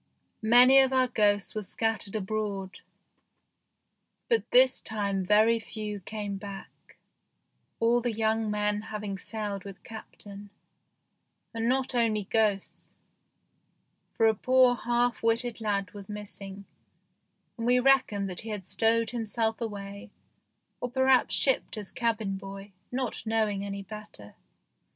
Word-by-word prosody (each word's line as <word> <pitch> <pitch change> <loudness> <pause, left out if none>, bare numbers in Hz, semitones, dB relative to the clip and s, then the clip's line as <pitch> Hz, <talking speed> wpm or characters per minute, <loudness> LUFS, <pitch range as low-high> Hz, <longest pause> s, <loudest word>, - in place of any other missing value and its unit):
Many 245 +4 +7
of 265 -1 +4
our 260 -1 +3
ghosts 205 -4 +1
were 215 - -3
scat 225 +2 -1
tered 200 +1 -2
abroad, 200 -2 -3 1.5
but 460 -2 +1
this 255 +1 +5
time 200 -3 -2
very 215 +4 +4
few 210 -1 -6
came 205 +1 -5
back, 200 -1 -11 0.8
all 235 +1 +3
the 240 0 -1
young 220 0 0
men 210 0 0
having 210 -2 -5
sailed 205 -3 -5
with 195 -1 -11
Captain; 205 -2 -11 1.0
and 230 +1 -1
not 265 0 0
only 225 -4 +1
ghosts, 205 -1 -1 1.3
for 225 - +4
a 220 - +5
poor 255 +3 +4
half 240 -1 0
witted 230 +1 0
lad 200 -3 -1
was 200 0 -11
missing, 200 -1 -8 0.9
and 230 -1 -4
we 250 0 +4
reckoned 250 -7 +3
that 180 -2 -4
he 225 - -8
had 205 -4 -5
stowed 225 +2 +1
himself 225 -1 -2
away 200 -2 -6 0.7
or 245 - -3
perhaps 260 0 +3
shipped 265 -4 +2
as 205 -2 -6
cabin 220 -5 -1
boy, 195 +1 -9 0.2
not 250 -3 -3
knowing 215 -3 0
any 200 0 -5
better. 210 - -8
215 Hz, 130 wpm, -28 LUFS, 200-235 Hz, 1.5 s, Many